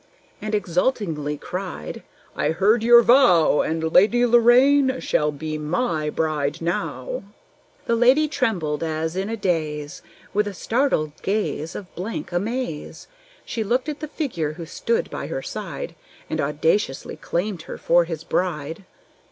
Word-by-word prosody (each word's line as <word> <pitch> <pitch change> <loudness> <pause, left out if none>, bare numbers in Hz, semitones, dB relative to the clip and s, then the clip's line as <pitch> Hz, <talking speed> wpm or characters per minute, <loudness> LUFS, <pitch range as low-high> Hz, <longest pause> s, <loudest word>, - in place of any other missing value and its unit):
And 215 0 -1
exultingly 170 - -1
cried, 180 - -6 0.3
"I 145 - 0
heard 200 +8 +3
your 235 +1 +7
vow; 220 - +5
And 160 0 -2
Lady 240 +6 +5
Lorraine 255 +3 +5
shall 150 0 +1
be 155 +1 -5
my 155 -1 -1
bride 155 -1 -1
now!" 340 - -3 0.6
The 235 - +2
lady 255 +6 +4
trembled, 190 - -1
as 160 +1 -2
in 190 +2 -2
a 225 - -3
daze; 155 -7 -2 0.3
With 210 +1 +1
a 200 - -5
startled 225 - 0
gaze 195 -5 -2
of 190 -3 -8
blank 190 +1 -5
amaze, 200 -2 -3 0.4
She 225 - -2
looked 250 +6 0
at 300 0 -5
the 310 - -5
figure 185 - -3
who 165 +1 -8
stood 230 +7 -1
by - - -5
her - - -4
side - - -6 0.4
And - - 0
audaciously 475 -3 0
claimed 180 0 -2
her - - -5
for 175 0 +3
his 165 -2 -5
bride. 165 0 -2
185 Hz, 145 wpm, -23 LUFS, 160-240 Hz, 0.6 s, your